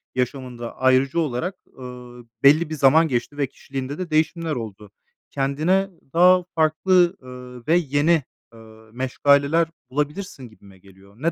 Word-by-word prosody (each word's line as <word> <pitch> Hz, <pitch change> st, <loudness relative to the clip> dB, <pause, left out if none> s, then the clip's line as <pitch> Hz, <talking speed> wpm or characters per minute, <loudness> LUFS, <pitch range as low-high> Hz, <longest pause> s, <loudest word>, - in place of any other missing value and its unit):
yaşamında, 125 Hz, -2 st, -4 dB
ayırıcı 130 Hz, +4 st, +2 dB
olarak, 165 Hz, +5 st, -2 dB, 0.2 s
ııı, 125 Hz, -1 st, -11 dB, 0.2 s
belli 150 Hz, +3 st, +5 dB
bir 155 Hz, -, -4 dB
zaman 155 Hz, +3 st, +4 dB
geçti 140 Hz, +2 st, -3 dB
ve 140 Hz, -, 0 dB
kişiliğinde 135 Hz, +2 st, -7 dB
de 185 Hz, -2 st, -5 dB
değişimler 160 Hz, 0 st, 0 dB
oldu. 105 Hz, -3 st, -8 dB, 0.4 s
Kendine 155 Hz, +8 st, 0 dB, 0.2 s
daha 180 Hz, +1 st, +5 dB
farklı, 175 Hz, +3 st, +2 dB
ııı, 125 Hz, -1 st, -11 dB
ve 165 Hz, -, +4 dB
yeni, 155 Hz, 0 st, +2 dB, 0.3 s
ııı, 110 Hz, 0 st, -17 dB
meşgaleler 140 Hz, +5 st, +2 dB, 0.2 s
bulabilirsin 145 Hz, -, -4 dB
gibime 100 Hz, -3 st, -19 dB
geliyor. 95 Hz, +1 st, -20 dB
Ne 165 Hz, +4 st, 0 dB
140 Hz, 135 wpm, -22 LUFS, 125-160 Hz, 0.4 s, belli